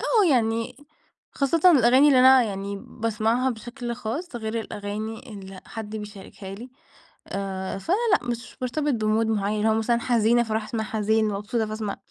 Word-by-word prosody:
آه 435 -5 +3
يعني، 230 -2 0 0.6
خاصةً 325 +6 +3
الأغاني 260 -1 +6
اللي 265 -3 +5
أنا 260 0 +7
يعني 200 -2 -4
باسمعها 230 +3 0
بشكل 240 +1 -6
خاص، 250 +5 -5
غير 225 0 -3
الأغاني 215 +2 -6
اللي 195 -2 -9
حد 220 -1 -6
بيشاركها 200 -2 -9
لي. 240 +5 -10 0.6
آآ 190 -1 -4
فأنا 335 - 0 0.2
لأ، 245 - +1
مش 235 +1 -5
بارتبط 290 +3 -1
بmood 215 +1 +2
معيّن 210 -1 0
اللي 215 +1 +2
هو 220 - +3
مثلًا 235 +2 +1
حزينة 235 0 +3
فاروح 220 -1 -2
أسمع 220 +1 -3
حزين، 220 0 +1
مبسوطة 210 +3 -2
فاسمع 215 -1 -4
225 Hz, 160 wpm, -25 LUFS, 210-245 Hz, 0.6 s, أنا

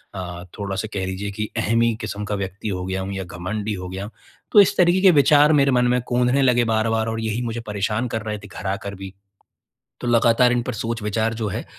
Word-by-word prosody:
अ, 90 -1 -6 0.2
थोड़ा-सा 100 +1 -3
कह 95 -2 -2
लीजिए 100 +2 -4
कि 105 +1 -4
अहमी 115 +1 +2
किस्म 105 0 -4
का 105 - -2
व्यक्ति 100 +2 -5
हो 90 -2 -3
गया 95 0 -2
हूँ 95 +1 -4
या 95 -1 -4
घमंडी 100 +5 -4
हो 90 -1 -6
गया। 95 +3 -6 0.4
तो 210 - +7
इस 195 - +2
तरीके 180 +1 +4
के 190 -2 +7
विचार 150 0 +5
मेरे 140 -2 +4
मन 125 -1 +3
में 125 0 +2
कौंधने 125 +1 +1
ने 140 - +3
लगे 120 -2 +4
बार-बार 110 0 +1
और 115 - -3
यही 110 +1 -2
मुझे 115 0 -3
परेशान 105 +4 -1
कर 110 -1 -3
रहे 105 -1 -3
थे 100 - -12
घर 100 -1 -7
आकर 100 +1 -4
भी। 95 0 -9 0.9
तो 120 - -3
लगातार 120 +1 +4
इन 120 - +1
पर 125 - -4
सोच-विचार 115 0 -2
जो 110 -1 -3
है, - - -4
110 Hz, 230 wpm, -22 LUFS, 100-120 Hz, 0.9 s, तो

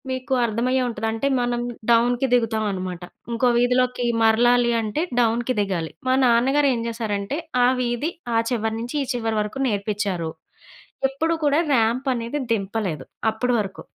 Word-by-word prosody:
మీకు 260 +1 -3
అర్థమయ్యే 245 +4 0
ఉంటది. 225 -2 -3
అంటే 225 +5 -1
మనం 240 0 -1 0.3
డౌన్‌కి 240 +2 +3
దిగుతావనమాట. 210 -6 0 0.3
ఇంకో 235 +2 +1
వీధిలోకి 250 0 +2 0.2
మరలాలి 240 +2 +4
అంటే 220 +7 -2 0.2
డౌన్‌కి 240 +2 +1
దిగాలి. 180 -5 -2 0.2
మా 255 - +3
నాన్నగారేం 255 +1 +3
చేశారంటే, 220 +1 -3 0.3
ఆ - - +5
వీధి, 245 +6 -1 0.2
ఆ - - +4
చివరి 225 -2 -1
నుంచి 240 +5 -5
ఈ - - -5
చివరి 225 -2 -1
వరకు 210 +5 -5
నేర్పించారు. 200 -6 -2 0.8
ఎప్పుడు 320 +5 -1
కూడా 290 +1 +3
ర్యాంపనేది 240 +2 0
దింపలేదు 195 -7 -2 0.3
అప్పటి 245 +3 -1
వరకు. 195 -2 -7
235 Hz, 135 wpm, -23 LUFS, 215-250 Hz, 0.8 s, ఆ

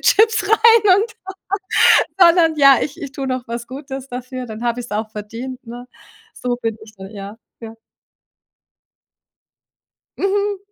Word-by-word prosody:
Chips 445 +2 +3
rein 445 -3 +5
und 440 +3 -1 1.1
sondern 340 -2 +5
ja, 275 -2 +7
ich 300 +4 -5
ich 280 -1 -7
tue 275 - -5
noch 255 -1 -3
was 235 0 -5
Gutes 270 0 -8
dafür, 255 0 -7
dann 220 0 -8
habe 240 0 -1
ich's 245 - -9
auch 215 +1 -3
verdient, 230 +5 -8
ne? 245 +2 -9 0.5
So 245 -1 -3
bin 225 -1 -2
ich 215 - -16
dann, 190 +1 -10
ja, 200 0 -9 0.2
ja. 225 0 -9 2.4
Mhm, 405 +1 -1
255 Hz, 140 wpm, -19 LUFS, 230-340 Hz, 2.4 s, ja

